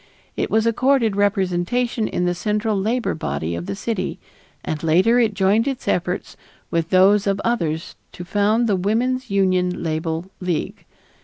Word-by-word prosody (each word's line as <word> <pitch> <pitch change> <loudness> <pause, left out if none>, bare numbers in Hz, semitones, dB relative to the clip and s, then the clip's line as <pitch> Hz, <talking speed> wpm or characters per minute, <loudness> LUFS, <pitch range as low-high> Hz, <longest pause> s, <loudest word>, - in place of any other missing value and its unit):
It - - -1
was 220 0 +2
accorded 235 -2 +2
representation 205 +4 0
in 180 - -1
the 175 - +1
central 210 +4 -1
labor 225 +5 0
body 80 - -3
of 85 +1 -5
the 100 - -3
city, 185 - -3 0.5
and 155 -1 -3
later 185 +9 +3
it 220 -4 +2
joined 205 +5 +2
its 270 -3 -4
efforts 180 +1 -1 0.4
with 165 0 0
those 195 +2 +4
of 195 0 +1
others 170 -9 -1 0.2
to 175 - -8
found 210 +5 +2
the 210 -4 +2
Woman's 240 +7 0
Union 185 -2 +1
Label 160 +2 -3
League. 180 -4 -3
195 Hz, 155 wpm, -21 LUFS, 175-225 Hz, 0.5 s, those